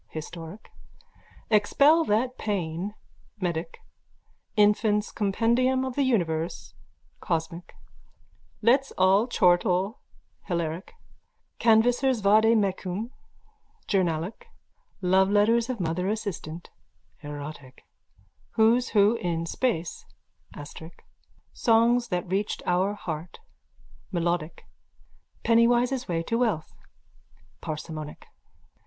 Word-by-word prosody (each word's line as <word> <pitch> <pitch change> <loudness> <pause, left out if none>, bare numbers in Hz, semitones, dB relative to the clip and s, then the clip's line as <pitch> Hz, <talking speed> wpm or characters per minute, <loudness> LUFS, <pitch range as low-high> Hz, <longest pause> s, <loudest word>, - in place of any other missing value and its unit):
(historic), 165 +4 -9 0.8
Expel 280 +10 +4
that 245 +5 0
Pain 190 -1 -3 0.4
(medic), 170 -3 -3 0.8
Infant's 210 0 +3
Compendium 235 +5 +1
of 260 - -4
the 285 - +1
Universe 170 -11 -1 0.5
(cosmic), 165 +1 -4 0.9
Let's 265 +5 +3
All 190 +5 +4
Chortle 185 0 +2 0.5
(hilaric), 170 - -3 0.7
Canvasser's 240 +2 +3
Vade 220 +3 +5
Mecum 195 +2 -2 0.7
(journalic), 175 -1 -1 0.6
Loveletters 205 +5 +3
of 250 -3 -3
Mother 180 +2 -1
Assistant 180 -6 -5 0.5
(erotic), 145 -3 -9 0.7
Who's 230 +3 +3
Who 210 +2 +4
in 165 -4 -2
Space 175 -3 -2 0.5
(astric), 160 +3 -10 0.5
Songs 235 +1 +3
that 180 -5 -2
Reached 195 +3 -2
Our 185 +3 +1
Heart 165 -3 -6 0.7
(melodic), 170 -2 -2 0.8
Pennywise's 240 +2 +3
Way 165 -1 -1
to 230 +7 -1
Wealth 215 -11 -1 0.9
(parsimonic). 155 -1 -6
200 Hz, 85 wpm, -26 LUFS, 170-230 Hz, 0.9 s, Vade